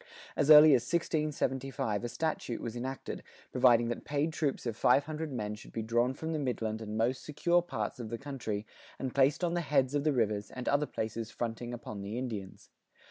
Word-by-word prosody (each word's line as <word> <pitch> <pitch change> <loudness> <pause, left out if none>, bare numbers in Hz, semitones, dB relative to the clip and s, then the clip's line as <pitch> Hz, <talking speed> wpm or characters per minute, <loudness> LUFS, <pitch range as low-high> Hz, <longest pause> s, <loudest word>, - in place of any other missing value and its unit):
As 145 - +1
early 150 0 +10
as 125 - +5
1675 135 -7 -1
a 120 - -2
statute 125 -2 -2
was 115 0 -5
enacted,[84:1] 130 +2 -5 0.3
providing 120 -2 +5
that 120 - -3
paid 150 +2 -1
troops 145 -5 -1
of 115 -3 -2
five 125 +4 +4
hundred 155 0 -4
men 105 -5 -3
should 105 - -11
be 115 - -3
drawn 120 +3 +1
from 160 +3 -4
the 155 - -1
midland 115 -5 -2
and 110 0 -4
most 120 +3 0
secure 170 +4 +2
parts 175 - -4
of 115 -3 -5
the 115 - -3
country 115 -6 -4 0.3
and 130 -2 -4
placed 140 +5 +3
on 170 -1 +1
the 175 - +1
"heads 140 -4 +2
of 145 -1 +1
the 155 - +3
rivers" 105 -5 0
and 125 -1 -7
other 145 +1 +2
places 110 +1 -4
fronting 120 0 -4
upon 110 -4 -6
the 100 +4 -5
Indians. 110 -7 -6
125 Hz, 200 wpm, -31 LUFS, 115-145 Hz, 0.3 s, early